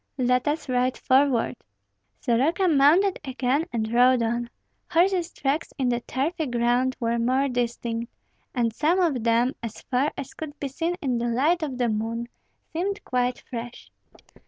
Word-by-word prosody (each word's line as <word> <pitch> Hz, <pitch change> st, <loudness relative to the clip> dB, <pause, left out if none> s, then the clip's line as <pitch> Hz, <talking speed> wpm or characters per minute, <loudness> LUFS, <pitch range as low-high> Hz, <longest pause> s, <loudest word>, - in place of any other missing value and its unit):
"Let 250 Hz, 0 st, +1 dB
us 300 Hz, +1 st, -1 dB
ride 255 Hz, 0 st, +1 dB
forward!" 260 Hz, -3 st, +2 dB, 0.6 s
Soroka 305 Hz, -, +2 dB
mounted 330 Hz, +6 st, +4 dB
again 265 Hz, +3 st, 0 dB
and 220 Hz, -1 st, -2 dB
rode 250 Hz, 0 st, +5 dB
on. 235 Hz, +1 st, -1 dB, 0.4 s
Horses' 355 Hz, 0 st, +2 dB
tracks 280 Hz, +4 st, -2 dB
in 260 Hz, -3 st, +1 dB
the 240 Hz, -1 st, +1 dB
turfy 295 Hz, +6 st, -2 dB
ground 245 Hz, +2 st, +1 dB
were 235 Hz, -1 st, 0 dB
more 260 Hz, +4 st, +2 dB
distinct; 235 Hz, -2 st, -2 dB, 0.4 s
and 235 Hz, -3 st, +1 dB
some 320 Hz, -, +2 dB
of 300 Hz, -10 st, +1 dB
them, 235 Hz, +3 st, +2 dB
as 230 Hz, -2 st, -6 dB
far 270 Hz, +4 st, +2 dB
as 275 Hz, -, -6 dB
could 305 Hz, -2 st, -8 dB
be 280 Hz, -, -3 dB
seen 330 Hz, +6 st, -2 dB
in 250 Hz, -4 st, 0 dB
the 240 Hz, -, -1 dB
light 290 Hz, +9 st, +2 dB
of 280 Hz, -5 st, -3 dB
the 245 Hz, -1 st, +1 dB
moon, 230 Hz, +2 st, -2 dB, 0.4 s
seemed 395 Hz, +5 st, -2 dB
quite 250 Hz, 0 st, 0 dB
fresh. 240 Hz, -1 st, -7 dB
255 Hz, 160 wpm, -25 LUFS, 235-300 Hz, 0.6 s, rode